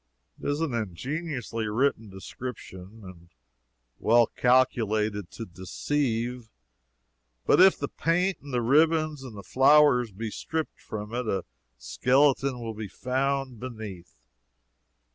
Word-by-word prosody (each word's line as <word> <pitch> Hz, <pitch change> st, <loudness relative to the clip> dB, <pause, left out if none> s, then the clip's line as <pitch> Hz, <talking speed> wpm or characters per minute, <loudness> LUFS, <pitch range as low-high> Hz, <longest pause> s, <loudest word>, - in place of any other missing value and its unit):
It -, -, -2 dB
is 145 Hz, +2 st, -1 dB
an 160 Hz, -6 st, -1 dB
ingeniously 120 Hz, -, -3 dB
written 115 Hz, 0 st, 0 dB
description, 95 Hz, 0 st, -9 dB
and 85 Hz, -2 st, -13 dB, 0.7 s
well 120 Hz, +1 st, +5 dB
calculated 110 Hz, -6 st, +1 dB
to 115 Hz, -, -7 dB
deceive. 115 Hz, -, -3 dB, 1.0 s
But -, -, +5 dB
if 190 Hz, 0 st, +7 dB
the -, -, -3 dB
paint 180 Hz, +2 st, 0 dB
and 140 Hz, -, -10 dB
the 120 Hz, -1 st, 0 dB
ribbons 155 Hz, +3 st, +3 dB
and 120 Hz, -5 st, -9 dB
the 100 Hz, -, -8 dB
flowers 135 Hz, -3 st, +4 dB
be 110 Hz, +3 st, -5 dB
stripped 160 Hz, +7 st, -4 dB
from 105 Hz, +1 st, -7 dB
it, 125 Hz, -1 st, -2 dB
a 95 Hz, -3 st, -1 dB, 0.3 s
skeleton 130 Hz, -, +2 dB
will 115 Hz, -1 st, -5 dB
be 110 Hz, -1 st, -6 dB
found 130 Hz, +2 st, -2 dB
beneath. 105 Hz, -, -9 dB
120 Hz, 125 wpm, -27 LUFS, 105-140 Hz, 1.0 s, if